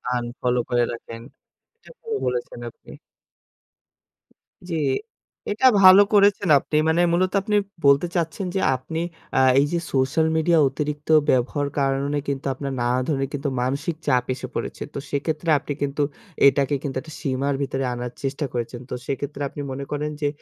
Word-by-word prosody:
Unfollow 125 Hz, +1 st, -1 dB
করে 120 Hz, 0 st, +2 dB
রাখেন। 115 Hz, -1 st, -8 dB, 0.5 s
এটা 460 Hz, -, -18 dB
ভালো 450 Hz, -2 st, -2 dB
বলেছেন 125 Hz, -1 st, -3 dB
আপনি। -, -, -17 dB, 1.8 s
জি, 170 Hz, -, -3 dB, 0.7 s
এটা 225 Hz, +6 st, 0 dB, 0.2 s
ভালো 190 Hz, +1 st, +9 dB
করেছেন 200 Hz, -3 st, +4 dB
আপনি। 150 Hz, -, -5 dB
মানে 170 Hz, +2 st, +3 dB
মূলত 185 Hz, +1 st, +2 dB
আপনি 210 Hz, +1 st, -1 dB, 0.3 s
বলতে 140 Hz, +5 st, +5 dB
চাচ্ছেন 170 Hz, +2 st, -1 dB
যে, -, -, +2 dB, 0.2 s
আপনি 160 Hz, +6 st, -5 dB, 0.4 s
আ -, -, +5 dB, 0.2 s
এই 140 Hz, -, +4 dB
যে 170 Hz, -, +1 dB
সোশ্যাল 135 Hz, +5 st, +2 dB
মিডিয়া 160 Hz, +1 st, +3 dB
অতিরিক্ত 150 Hz, +2 st, -4 dB, 0.2 s
ব্যবহার 135 Hz, +3 st, +1 dB
কারণে 140 Hz, +1 st, 0 dB
কিন্তু 140 Hz, -1 st, -3 dB
আপনার 135 Hz, +1 st, -5 dB
নানা 125 Hz, +1 st, +1 dB
ধরনের 135 Hz, -3 st, -1 dB
কিন্তু 145 Hz, 0 st, -2 dB
মানসিক 140 Hz, +6 st, -1 dB
চাপ 125 Hz, -1 st, +3 dB
এসে 130 Hz, 0 st, -7 dB
পড়েছে। -, -, -4 dB
তো -, -, -4 dB
সেক্ষেত্রে 155 Hz, +3 st, -2 dB
আপনি 145 Hz, 0 st, -5 dB
কিন্তু 145 Hz, +1 st, -1 dB, 0.5 s
এটাকে 140 Hz, +1 st, +2 dB
কিন্তু 135 Hz, -2 st, -4 dB
একটা 155 Hz, -1 st, -12 dB
সীমার 140 Hz, +1 st, -1 dB
ভিতরে 135 Hz, -1 st, -2 dB
আনার 120 Hz, 0 st, -5 dB
চেষ্টা 140 Hz, +2 st, -2 dB
করেছেন। 120 Hz, 0 st, -4 dB
তো -, -, -5 dB
সেক্ষেত্রে 145 Hz, +1 st, -4 dB
আপনি 145 Hz, -, -7 dB
মনে 140 Hz, +1 st, -5 dB
করেন 150 Hz, +1 st, -2 dB
যে, 145 Hz, -, +2 dB
140 Hz, 160 wpm, -23 LUFS, 130-160 Hz, 1.8 s, ভালো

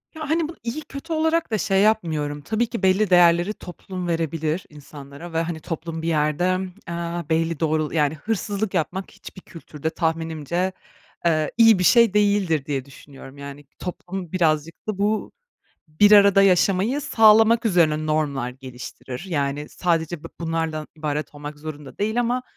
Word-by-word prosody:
Ya, 310 Hz, -2 st, -6 dB
hani, 320 Hz, 0 st, +1 dB
bunu 330 Hz, -, -10 dB
iyi 240 Hz, +7 st, -4 dB
kötü 300 Hz, +3 st, -7 dB
olarak 320 Hz, -1 st, +1 dB
da 215 Hz, -, +1 dB
şey 195 Hz, -1 st, +1 dB
yapmıyorum, 160 Hz, -9 st, 0 dB
tabii 220 Hz, +8 st, -1 dB
ki 230 Hz, -4 st, -6 dB
belli 190 Hz, +2 st, +3 dB
değerleri 175 Hz, +2 st, +5 dB
toplum 180 Hz, -1 st, -8 dB
verebilir 165 Hz, 0 st, -2 dB
insanlara 145 Hz, +2 st, -11 dB
ve, 165 Hz, -, +1 dB
hani, 165 Hz, -1 st, -4 dB
toplum 165 Hz, +1 st, -5 dB
bir 165 Hz, -, -4 dB
yerde, 165 Hz, +4 st, +1 dB, 0.3 s
aaa, 170 Hz, -1 st, -4 dB
belli 165 Hz, -1 st, 0 dB
doğrul 155 Hz, -1 st, 0 dB
yani 150 Hz, -2 st, +1 dB
hırsızlık 205 Hz, +3 st, -3 dB
yapmak 185 Hz, +2 st, -2 dB
hiçbir 185 Hz, -, -12 dB
kültürde 160 Hz, -3 st, -6 dB
tahminimce, 165 Hz, +2 st, -2 dB, 0.5 s
eee, 155 Hz, -3 st, +2 dB
iyi 225 Hz, -4 st, +6 dB
bir -, -, +1 dB
şey 230 Hz, +1 st, +5 dB
değildir 200 Hz, -8 st, +2 dB
diye 135 Hz, -3 st, -3 dB
düşünüyorum. 140 Hz, 0 st, -14 dB
Yani, 140 Hz, +1 st, -9 dB
toplum 180 Hz, -1 st, -6 dB
birazcık 165 Hz, -2 st, 0 dB
da 215 Hz, -3 st, -2 dB
bu 210 Hz, +2 st, 0 dB, 0.6 s
bir 205 Hz, +7 st, +4 dB
arada 200 Hz, -1 st, +7 dB
yaşamayı 195 Hz, +7 st, +3 dB
sağlamak 225 Hz, -3 st, +5 dB
üzerine 155 Hz, -6 st, +2 dB
normlar 145 Hz, -5 st, -1 dB
geliştirir. 130 Hz, +2 st, -9 dB
Yani, 145 Hz, -2 st, -2 dB
sadece 165 Hz, -2 st, -1 dB
bu -, -, -6 dB
bunlardan 160 Hz, -2 st, -2 dB
ibaret 150 Hz, -1 st, -3 dB
olmak 145 Hz, 0 st, -8 dB
zorunda 150 Hz, -2 st, -9 dB
değil 220 Hz, +4 st, 0 dB
ama 245 Hz, +1 st, 0 dB
170 Hz, 155 wpm, -23 LUFS, 155-205 Hz, 0.6 s, arada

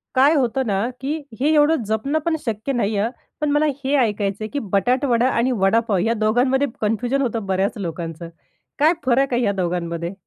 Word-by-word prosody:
काय 275 Hz, +4 st, +5 dB
होतं 265 Hz, -1 st, +1 dB
ना, 205 Hz, +3 st, 0 dB
की 285 Hz, +4 st, -2 dB, 0.2 s
हे 300 Hz, +4 st, +2 dB
एवढं 300 Hz, -2 st, +3 dB
जपणं 220 Hz, +8 st, 0 dB
पण 335 Hz, -, +1 dB
शक्य 225 Hz, +4 st, -2 dB
नाही 220 Hz, -4 st, 0 dB
आहे 200 Hz, -, +1 dB
हं, 235 Hz, -, -6 dB, 0.3 s
पण 300 Hz, -1 st, +1 dB
मला 295 Hz, +1 st, +3 dB, 0.2 s
हे 275 Hz, +2 st, +1 dB
ऐकायचं 210 Hz, -3 st, 0 dB
आहे -, -, -3 dB
की 285 Hz, -, 0 dB
बटाटावडा 250 Hz, +3 st, +2 dB
आणि 245 Hz, +3 st, +1 dB
वडापाव 210 Hz, +1 st, +2 dB
या 225 Hz, +6 st, +1 dB
दोघांमध्ये 245 Hz, +6 st, +2 dB
कन्फ्युजन 240 Hz, +5 st, 0 dB
होतं 230 Hz, -5 st, -2 dB
बऱ्याच 190 Hz, +1 st, 0 dB
लोकांचं. 165 Hz, -2 st, -5 dB, 0.5 s
काय 310 Hz, +4 st, +5 dB
फरक 260 Hz, +1 st, +2 dB
आहे 240 Hz, -, +2 dB
या 205 Hz, -, +2 dB
दोघांमध्ये? 170 Hz, -2 st, -3 dB
230 Hz, 185 wpm, -21 LUFS, 200-270 Hz, 0.5 s, काय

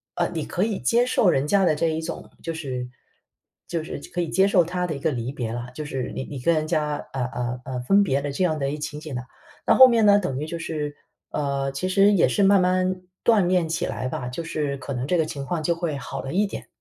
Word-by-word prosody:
呃， -, -, +1 dB
你 160 Hz, -3 st, -3 dB
可 180 Hz, -, -1 dB
以 215 Hz, -2 st, -1 dB
接 235 Hz, -, +3 dB
受 220 Hz, -5 st, +3 dB
人 135 Hz, -4 st, +2 dB
家 195 Hz, +2 st, +3 dB
的 155 Hz, -, +3 dB
这 165 Hz, +2 st, +1 dB
一 160 Hz, 0 st, -1 dB
种 160 Hz, -, -6 dB
就 165 Hz, -, -3 dB
是 130 Hz, -6 st, -4 dB, 0.8 s
就 165 Hz, -2 st, -2 dB
是 155 Hz, -, -6 dB
可 175 Hz, -, 0 dB
以 170 Hz, -, -2 dB
接 190 Hz, +3 st, +4 dB
受 190 Hz, -3 st, +4 dB
他 180 Hz, +2 st, -2 dB
的 155 Hz, -, -3 dB
一 140 Hz, -, -6 dB
个 160 Hz, -, +1 dB
离 120 Hz, 0 st, -3 dB
别 120 Hz, -5 st, -4 dB
了， 120 Hz, +1 st, -4 dB
就 155 Hz, -, -5 dB
是 135 Hz, -3 st, -4 dB
你 130 Hz, -, -3 dB
你 140 Hz, -, -7 dB
跟 170 Hz, +7 st, +3 dB
人 155 Hz, 0 st, 0 dB
家， 150 Hz, -2 st, 0 dB, 0.2 s
呃 130 Hz, -2 st, -1 dB
呃 125 Hz, 0 st, -4 dB
呃， 130 Hz, -2 st, -4 dB
分 195 Hz, +10 st, +4 dB
别 140 Hz, -7 st, +1 dB
的 145 Hz, 0 st, -3 dB
这 160 Hz, +7 st, -1 dB
样 155 Hz, -3 st, +1 dB
的 135 Hz, -1 st, 0 dB
一 145 Hz, -, -2 dB
个 -, -, -9 dB
情 150 Hz, 0 st, -4 dB
景 155 Hz, -3 st, -7 dB
呢， 125 Hz, -, -3 dB, 0.4 s
那 -, -, +5 dB
后 260 Hz, 0 st, +10 dB
面 230 Hz, -3 st, +3 dB
呢， 205 Hz, 0 st, +7 dB
等 135 Hz, -9 st, -2 dB
于 150 Hz, -, -3 dB
就 170 Hz, +1 st, -5 dB
是 150 Hz, -3 st, -4 dB, 0.4 s
呃， 140 Hz, -2 st, -1 dB
其 160 Hz, +7 st, -3 dB
实 200 Hz, +2 st, +5 dB
也 195 Hz, -, +4 dB
是 200 Hz, -, +1 dB
慢 195 Hz, -1 st, +6 dB
慢 185 Hz, 0 st, +1 dB, 0.2 s
锻 215 Hz, -6 st, +4 dB
炼 180 Hz, -2 st, +2 dB
起 165 Hz, +2 st, -1 dB
来 130 Hz, -, -3 dB
吧， 130 Hz, -1 st, -4 dB
就 125 Hz, +7 st, -5 dB
是 150 Hz, -3 st, -2 dB
可 135 Hz, +1 st, -6 dB
能 125 Hz, +1 st, -3 dB
这 180 Hz, +3 st, +2 dB
个 160 Hz, -, +2 dB
情 140 Hz, -3 st, -5 dB
况 165 Hz, +2 st, -2 dB
就 170 Hz, +2 st, +2 dB
会 165 Hz, -4 st, -2 dB
好 135 Hz, -, -5 dB
了 135 Hz, -, -6 dB
一 200 Hz, +4 st, +3 dB
点。 -, -, -7 dB
155 Hz, 295 characters per minute, -24 LUFS, 135-180 Hz, 0.8 s, 后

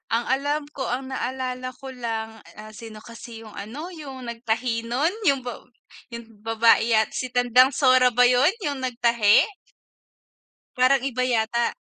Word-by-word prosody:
Ang 235 Hz, -, -1 dB
alam 290 Hz, +2 st, -2 dB
ko, 270 Hz, -, -4 dB
ang 265 Hz, -, -6 dB
naalala 255 Hz, -1 st, -4 dB
ko 270 Hz, -, -8 dB, 0.2 s
lang, 225 Hz, -1 st, -3 dB, 0.3 s
ah, 215 Hz, 0 st, -12 dB
sino 220 Hz, 0 st, -10 dB
kasi 230 Hz, 0 st, -11 dB
yung 215 Hz, -, -13 dB
ano, 285 Hz, -, -8 dB
yung 270 Hz, -3 st, -9 dB
nagtahi 230 Hz, 0 st, -2 dB
nun, 290 Hz, +9 st, +1 dB, 0.2 s
yung 275 Hz, -1 st, +1 dB
ba 245 Hz, -, -4 dB, 0.6 s
yung 235 Hz, 0 st, -7 dB, 0.2 s
babae 225 Hz, 0 st, +3 dB
yat 220 Hz, -1 st, +3 dB
si 255 Hz, -, -2 dB
Tandang 245 Hz, +2 st, +4 dB
Sora 255 Hz, -2 st, +5 dB
ba 250 Hz, -, +6 dB
yun, 285 Hz, +9 st, +4 dB
yung 285 Hz, -2 st, -2 dB
nagtahi? 235 Hz, -3 st, +3 dB, 1.4 s
Parang 255 Hz, +1 st, +4 dB
iba 255 Hz, -2 st, -1 dB
yata. 235 Hz, -1 st, 0 dB
245 Hz, 150 wpm, -24 LUFS, 230-260 Hz, 1.4 s, ba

